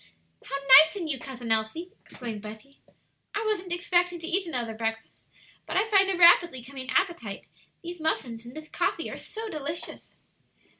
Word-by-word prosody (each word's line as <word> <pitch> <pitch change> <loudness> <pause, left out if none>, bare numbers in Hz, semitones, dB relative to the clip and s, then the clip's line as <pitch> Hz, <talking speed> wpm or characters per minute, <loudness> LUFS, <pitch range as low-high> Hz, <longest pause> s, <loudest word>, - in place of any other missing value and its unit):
"How 275 - -5 0.2
nice 315 +6 +4
in 360 -5 -4
you, 275 -4 -2
Cousin 245 -3 -6
Elsie!" 225 +12 0
exclaimed 225 -5 -8
Betty. 220 +6 -11 0.6
"I 430 +2 -1
wasn't 390 -4 -2
expecting 350 0 +1
to 330 - -7
eat 370 +1 0
another 240 -7 -2
breakfast, 225 0 -5 0.4
but - - -2
I 395 - +3
find 395 -3 +4
a 380 - 0
rapidly 340 -6 +6
coming 260 0 -8
appetite; 260 - -1 0.4
these 345 0 -7
muffins 250 -7 -2
and 240 +1 -12
this 310 0 -8
coffee - - -2
are - - -6
so 445 +1 -7
delicious." 310 -3 -6
310 Hz, 165 wpm, -27 LUFS, 240-355 Hz, 0.6 s, rapidly